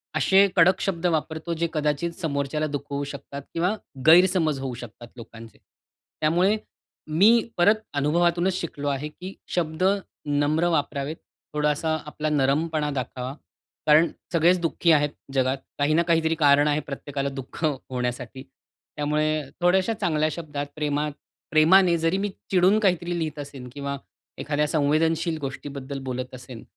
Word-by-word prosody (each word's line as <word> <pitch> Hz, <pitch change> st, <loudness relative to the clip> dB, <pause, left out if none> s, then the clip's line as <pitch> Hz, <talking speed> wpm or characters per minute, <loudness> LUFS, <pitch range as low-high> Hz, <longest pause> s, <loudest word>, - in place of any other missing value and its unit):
असे 190 Hz, +7 st, +5 dB
कडक 185 Hz, +1 st, +5 dB
शब्द 180 Hz, -3 st, -2 dB
वापरतो 160 Hz, +2 st, -3 dB
जे 170 Hz, +1 st, -1 dB
कदाचित 150 Hz, +2 st, 0 dB
समोरच्याला 150 Hz, 0 st, -1 dB
दुखवू 145 Hz, -1 st, -4 dB
शकतात 140 Hz, 0 st, -7 dB
किंवा 180 Hz, +5 st, +1 dB, 0.3 s
गैरसमज 165 Hz, -3 st, +5 dB
होऊ 135 Hz, -2 st, -4 dB
शकतात 120 Hz, -1 st, -10 dB
लोकांचे. 115 Hz, -1 st, -12 dB, 0.6 s
त्यामुळे 180 Hz, +7 st, +3 dB, 0.5 s
मी 215 Hz, +9 st, +5 dB
परत 200 Hz, +5 st, +5 dB, 0.2 s
अनुभवातूनच 170 Hz, +5 st, +2 dB
शिकलो 145 Hz, -3 st, -5 dB
आहे, 140 Hz, +1 st, -2 dB
की 180 Hz, +5 st, -9 dB, 0.2 s
शब्द 165 Hz, 0 st, -1 dB, 0.4 s
नम्र 145 Hz, +3 st, +1 dB
वापरावेत, 145 Hz, -1 st, -1 dB, 0.4 s
थोडासा 150 Hz, +1 st, 0 dB
आपला 150 Hz, +1 st, -3 dB
नरमपणा 150 Hz, +2 st, +1 dB
दाखावा. 130 Hz, -1 st, -4 dB, 0.5 s
कारण 155 Hz, +3 st, +6 dB, 0.2 s
सगळेच 175 Hz, +2 st, +4 dB
दुःखी 170 Hz, 0 st, +2 dB
आहेत 145 Hz, -2 st, +4 dB, 0.2 s
जगात 130 Hz, 0 st, +1 dB, 0.2 s
काही 145 Hz, +2 st, +2 dB
ना 165 Hz, -, +4 dB
काहीतरी 165 Hz, -1 st, +2 dB
कारण 145 Hz, -2 st, +4 dB
आहे 150 Hz, 0 st, +2 dB
प्रत्येकाला 140 Hz, 0 st, -4 dB
दुःख 135 Hz, +3 st, -8 dB
होण्यासाठी. 125 Hz, -2 st, -3 dB, 0.5 s
त्यामुळे 150 Hz, +1 st, 0 dB, 0.2 s
थोड्याश्या 190 Hz, +5 st, +3 dB
चांगल्या 155 Hz, -2 st, +1 dB
शब्दात 145 Hz, -3 st, -5 dB
प्रेमात 150 Hz, 0 st, -1 dB, 0.4 s
प्रेमाने 170 Hz, +3 st, +5 dB
जरी 165 Hz, +3 st, +1 dB
मी 205 Hz, +1 st, -1 dB, 0.2 s
चिडून 190 Hz, +3 st, +4 dB
काहीतरी 175 Hz, -4 st, +1 dB
लिहत 155 Hz, -2 st, -3 dB
असेन 140 Hz, -3 st, -8 dB
किंवा 140 Hz, 0 st, -4 dB, 0.4 s
एखाद्या 150 Hz, 0 st, 0 dB
संवेदनशील 160 Hz, +2 st, +1 dB
गोष्टीबद्दल 140 Hz, 0 st, -6 dB
बोलत 130 Hz, 0 st, -4 dB
असेन, 125 Hz, -2 st, -10 dB
150 Hz, 130 wpm, -25 LUFS, 140-170 Hz, 0.6 s, कारण